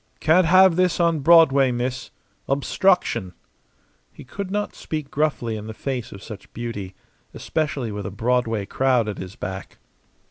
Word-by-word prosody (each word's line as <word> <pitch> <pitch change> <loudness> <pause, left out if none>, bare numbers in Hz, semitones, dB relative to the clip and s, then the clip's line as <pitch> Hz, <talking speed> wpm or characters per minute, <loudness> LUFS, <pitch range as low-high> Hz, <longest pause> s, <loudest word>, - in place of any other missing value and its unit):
"Can't 165 +3 +4
have 185 0 +6
this 185 -1 +2
on 170 -2 +2
Broadway, 140 -3 +5
miss. 125 +1 -3 0.4
Obstruction." 135 - +1 0.8
He - - -13
could 190 +9 -6
not 205 +1 -2
speak 155 -3 -6
gruffly 140 -7 -1
in 105 0 -7
the 110 - -7
face 125 -1 -4
of 100 -1 -11
such 110 - -10
beauty 105 -5 -6 0.4
especially 140 -7 -2
with 105 0 -5
a - - -3
Broadway 115 0 0
crowd 125 0 +1
at 105 - -5
his 95 +1 -8
back. 95 0 -7
130 Hz, 150 wpm, -23 LUFS, 110-160 Hz, 0.8 s, have